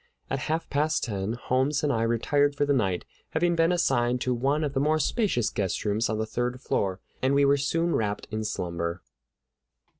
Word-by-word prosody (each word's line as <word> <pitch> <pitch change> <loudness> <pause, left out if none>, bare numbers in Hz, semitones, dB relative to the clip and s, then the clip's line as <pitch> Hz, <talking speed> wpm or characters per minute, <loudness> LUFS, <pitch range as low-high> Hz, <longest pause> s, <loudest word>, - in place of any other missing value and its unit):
At 135 - 0
half 165 +1 -1
past 150 +2 +1
ten 100 -2 -2
Holmes 130 +4 0
and 145 - +2
I 115 - 0
retired 140 +5 +2
for 145 - +1
the 145 - +2
night, 95 -9 0 0.3
having 170 +2 +2
been 165 +1 +3
assigned 125 -8 +2
to 125 - +1
one 140 +5 +1
of 145 -2 -2
the 150 +4 +2
spacious 155 - +1
guest 95 0 -2
rooms 105 +2 +1
on 110 - -1
the 110 - -1
third 125 +2 -2
floor; 95 -6 -1 0.2
and 130 +1 +2
soon - - +3
we 140 +4 +2
were - - +2
wrapped 105 -2 -2
in 110 0 -2
slumber. 85 -3 -3
130 Hz, 190 wpm, -27 LUFS, 110-145 Hz, 0.3 s, been